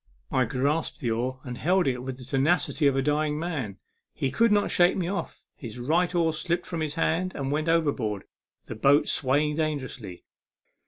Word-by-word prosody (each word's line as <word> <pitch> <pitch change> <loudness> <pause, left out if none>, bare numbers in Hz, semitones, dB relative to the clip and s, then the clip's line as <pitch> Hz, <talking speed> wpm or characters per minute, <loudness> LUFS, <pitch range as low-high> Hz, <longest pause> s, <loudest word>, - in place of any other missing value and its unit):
I - - +2
grasped 145 +5 -1
the 120 -5 -1
oar, 125 +3 -2
and 125 -1 -7
held 180 +4 +2
it 125 -2 0
with 130 0 -5
the 130 - -11
tenacity 145 +3 +2
of 140 - +2
a 135 - +1
dying 150 +1 +1
man. 145 - -3 0.4
He 135 - -1
could 230 +10 +3
not 205 -1 +2
shake 175 0 +4
me 180 -3 -1
off; 195 +2 -4
his 115 -3 -8
right 170 +8 +1
oar 165 -2 +2
slipped 170 +2 -1
from 170 -3 -4
his 155 -1 -2
hand 175 +2 0
and 140 -1 -3
went 155 +2 0
overboard; 140 -11 0 0.4
the - - -6
boat 140 +6 +4
swayed 150 +3 +1
dangerously. 130 - -3
150 Hz, 190 wpm, -27 LUFS, 130-165 Hz, 0.4 s, shake